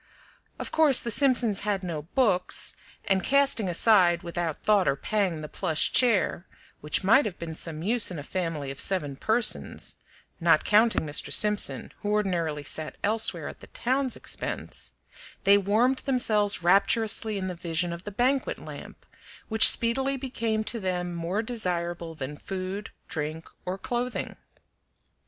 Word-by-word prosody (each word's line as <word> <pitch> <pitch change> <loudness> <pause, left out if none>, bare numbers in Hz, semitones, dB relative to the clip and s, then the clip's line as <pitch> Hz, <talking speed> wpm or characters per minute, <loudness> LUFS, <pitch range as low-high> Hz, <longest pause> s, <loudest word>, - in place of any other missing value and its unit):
Of - - -6
course 305 -5 +5
the 235 - -2
Simpsons 245 -6 +1
had 200 -2 -2
no 165 -4 -4
books, 185 - 0 0.3
and 190 -1 +1
casting 275 -7 +2
aside, 175 -2 +3
without 170 -2 -4
thought 205 -3 +3
or 140 - +2
pang, 185 0 -2
the 150 - -6
plush 155 +1 0
chair, 215 -7 +1 0.3
which 150 +6 -1
might 225 +9 +5
have 195 -4 -5
been 170 -1 -7
of 160 - -8
some 160 -1 -4
use 225 +4 +2
in 180 - -7
a 145 - -6
family 165 -5 -4
of 135 - -10
seven 150 -8 -1
persons 220 - 0 0.4
(not 165 -2 +3
counting 215 -4 +3
Mr. 145 -1 0
Simpson, 210 -1 +1
who 205 - -3
ordinarily 175 -8 -1
sat 155 +2 -5
elsewhere 220 +2 0
at - - -9
the - - -14
town's 260 +1 -1
expense), - - -6 0.5
they 200 +1 +6
warmed 225 +7 +1
themselves 215 -8 +1
rapturously 215 +3 +2
in 190 -1 -3
the 185 - -4
vision 170 0 -3
of 170 +1 -9
the 205 - -6
banquet 255 +6 0
lamp, - - -11 0.4
which 220 0 +11
speedily 265 +4 +1
became 230 -4 -3
to 230 +2 -2
them 180 -2 -3
more 170 +6 -3
desirable 175 -7 -3
than 145 0 -6
food, 190 +3 -6 0.2
drink, 155 0 -4 0.2
or 185 +1 -3
clothing. 245 +3 -4
195 Hz, 155 wpm, -26 LUFS, 170-225 Hz, 0.5 s, which